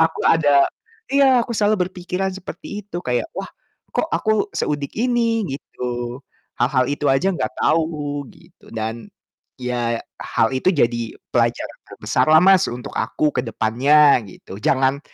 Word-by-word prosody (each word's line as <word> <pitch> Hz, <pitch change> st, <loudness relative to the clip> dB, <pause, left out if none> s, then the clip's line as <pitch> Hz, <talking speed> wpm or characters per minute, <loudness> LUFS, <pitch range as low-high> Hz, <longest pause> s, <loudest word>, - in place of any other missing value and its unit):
aku 160 Hz, 0 st, +2 dB
ada 145 Hz, -3 st, +4 dB, 0.4 s
ya 270 Hz, -3 st, +5 dB
aku 240 Hz, -, -5 dB
selalu 205 Hz, -4 st, +2 dB
berpikiran 185 Hz, +1 st, -3 dB
seperti 195 Hz, +2 st, -7 dB
itu, 175 Hz, -, -5 dB
kayak, 125 Hz, -1 st, -1 dB
"Wah -, -, -4 dB, 0.4 s
kok -, -, 0 dB
aku 215 Hz, -1 st, +1 dB
seudik 145 Hz, -1 st, -2 dB
ini," 230 Hz, -2 st, +1 dB
gitu, 125 Hz, -2 st, -5 dB, 0.4 s
hal-hal 130 Hz, +1 st, +2 dB
itu 145 Hz, +1 st, -3 dB
aja 135 Hz, +9 st, +2 dB
gak 130 Hz, -, -2 dB
tau 160 Hz, +1 st, +3 dB, 0.5 s
gitu -, -, -21 dB
dan 115 Hz, -, -4 dB, 0.5 s
ya 120 Hz, -2 st, -1 dB, 0.2 s
hal 115 Hz, -, 0 dB
itu 130 Hz, -, +1 dB
jadi 120 Hz, -5 st, 0 dB, 0.2 s
pelajaran -, -, 0 dB
yang -, -, -11 dB
besar -, -, +1 dB
lah, 155 Hz, -, +8 dB
Mas, 190 Hz, -1 st, +5 dB
untuk 120 Hz, +1 st, -7 dB
aku 115 Hz, +7 st, 0 dB
kedepannya 125 Hz, +4 st, +3 dB
gitu, 95 Hz, -, -11 dB
jangan 135 Hz, +1 st, +2 dB
145 Hz, 145 wpm, -21 LUFS, 120-190 Hz, 0.5 s, lah